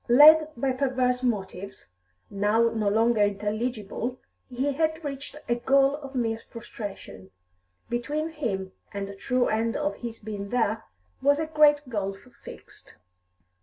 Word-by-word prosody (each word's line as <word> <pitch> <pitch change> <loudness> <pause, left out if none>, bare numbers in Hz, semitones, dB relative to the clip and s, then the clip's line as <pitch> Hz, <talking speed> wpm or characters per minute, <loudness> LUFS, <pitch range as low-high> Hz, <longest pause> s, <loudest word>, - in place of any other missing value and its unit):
Led 305 +5 +8
by 265 +2 +1
perverse 255 -1 0
motives, 200 - -3 0.4
now 210 +3 +2
no 215 -2 0
longer 225 +1 +3
intelligible, 215 +3 -1 0.3
he 265 +3 -1
had 315 +2 0
reached 280 0 -6
a 240 - +2
goal 270 +3 +3
of 275 -2 -10
mere 225 -3 0
frustration; 210 - -9 0.6
between 290 +7 -2
him 210 -12 -3 0.2
and 200 -1 -4
the 200 - -8
true 250 +5 +1
end 225 +1 0
of 295 0 -2
his 235 -2 -6
being 205 -2 -6
there 225 -2 0 0.4
was 285 +1 +4
a 315 - -1
great 300 -2 +4
gulf 195 -5 -3 0.3
fixed. - - -12
240 Hz, 135 wpm, -26 LUFS, 210-275 Hz, 0.6 s, Led